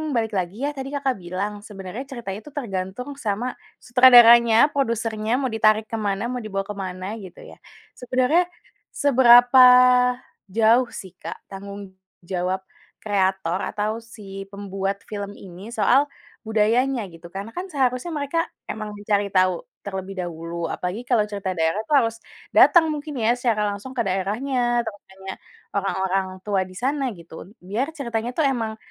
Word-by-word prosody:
balik 225 -2 0
lagi, 190 +9 -2
ya, - - 0
tadi 270 0 -5
Kakak 275 -2 0
bilang 190 +4 -3
sebenarnya 200 +4 -7
ceritanya 220 -6 -6
itu 295 - -12
tergantung 195 +2 -4
sama 240 0 -3 0.3
sutradaranya, 240 -1 +7
produsernya, 225 -4 -1
mau 260 -2 -1
ditarik 215 0 +3
ke 225 - -4
mana, 200 +2 -1
mau 250 -1 -3
dibawa 195 -2 -3
ke 210 - -6
mana, 185 +1 -6 0.2
gitu, 180 -2 -12
ya. - - -13 0.4
Sebenarnya 255 +7 +2 0.5
seberapa 250 -2 +6 0.9
jauh, 230 +3 +4
sih, 190 -2 -9
Kak, - - -6
tanggung 200 0 -9 0.3
jawab 185 +1 -2 0.4
kreator 190 -3 0
atau 210 +1 -1
si 195 -3 -9
pembuat 195 0 -4
film 205 -1 -5
ini 190 +3 -11
soal 270 +3 +4 0.4
budayanya, 225 +2 +1
gitu? 170 +1 -12
Karena, 200 +3 -5
kan, 360 +2 -4
seharusnya 260 +3 0
mereka 285 +3 -1 0.3
emang 215 -1 -6
mencari 205 -1 0
tau 185 -2 +2 0.2
terlebih 190 0 -5
dahulu, 170 -1 -4
apalagi 185 +9 -4
kalau 230 -4 +3
cerita 190 -3 -4
daerah, 165 +5 +1
tuh, 295 - +2
harus 230 -1 -1 0.4
datang 325 -3 +6
mungkin, 295 -1 -6
ya, 230 - +4
secara 225 -4 +1
langsung 205 +6 -8
ke 235 - +1
daerahnya, 240 +6 0
terus 205 -3 -7
tanya 190 0 -9 0.4
orang-orang 190 -1 0 0.2
tua 200 -2 0
di 185 - -14
sana, 275 +6 -1
gitu, 170 -1 -15
un - - -16
biar 220 +9 -2
ceritanya, 235 -4 -3
tuh, 315 - +1
emang 225 -3 -3
215 Hz, 150 wpm, -23 LUFS, 195-245 Hz, 0.9 s, sutradaranya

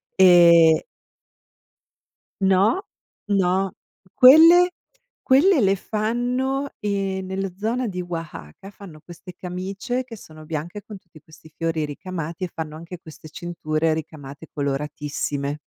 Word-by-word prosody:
Ehm 170 -3 +6 1.6
No, 195 - +3 0.5
no, 190 -1 +1 0.4
quelle 330 +7 +7 0.5
quelle 290 +4 +4
le 195 -1 +2
fanno, 245 +7 -2
ehm, 195 -2 -2
nella 190 +1 -3
zona 230 +4 -2
di 180 -3 -4
Wahaka, 165 - -8
fanno 175 -7 -13
queste 175 +3 -12
camicie, 195 +7 -4
che 240 -3 -11
sono 155 -4 -14
bianche 165 +6 -6
con 210 -3 -11
tutti 165 -4 -20
questi 160 0 -17
fiori 165 -2 -2
ricamati 165 +2 -7
e 175 - -6
fanno 155 -1 -6
anche 170 +2 -9
queste 155 0 -13
cinture 160 -1 -2
ricamate, 150 -1 -9
coloratissime. 145 0 -3
180 Hz, 115 wpm, -22 LUFS, 160-205 Hz, 1.6 s, quelle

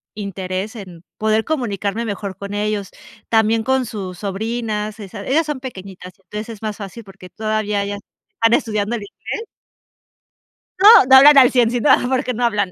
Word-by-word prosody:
interés 195 0 -5
en 180 -6 -11
poder 220 0 +1
comunicarme 225 -6 -2
mejor 200 -2 -5
con 200 0 -7
ellos, 205 -1 -2 0.4
también 220 0 +2
con 265 0 0
sus 190 -6 -7
sobrinas, 215 +1 -4
esas 200 0 -9
ellas 310 +5 +2
son 295 -3 -3
pequeñitas, 190 -7 -9
entonces 210 +3 -8
es 220 -3 -9
más 215 -2 -4
fácil 210 +3 -9
porque 195 -2 -14
todavía 215 -1 -2
ellas 200 0 -4 0.4
están 230 0 +2
estudiando 215 -1 0
el 230 - -5
inglés. 320 - -7 1.3
No, 395 - +6 0.2
no 265 - +8
hablan 285 +2 +8
al 255 -2 +7
100 245 -3 +3
sino, 245 +4 0
ah, - - +4
porque 260 -1 -1
no 245 +1 -3
hablan. 205 -5 0
215 Hz, 170 wpm, -19 LUFS, 200-235 Hz, 1.3 s, no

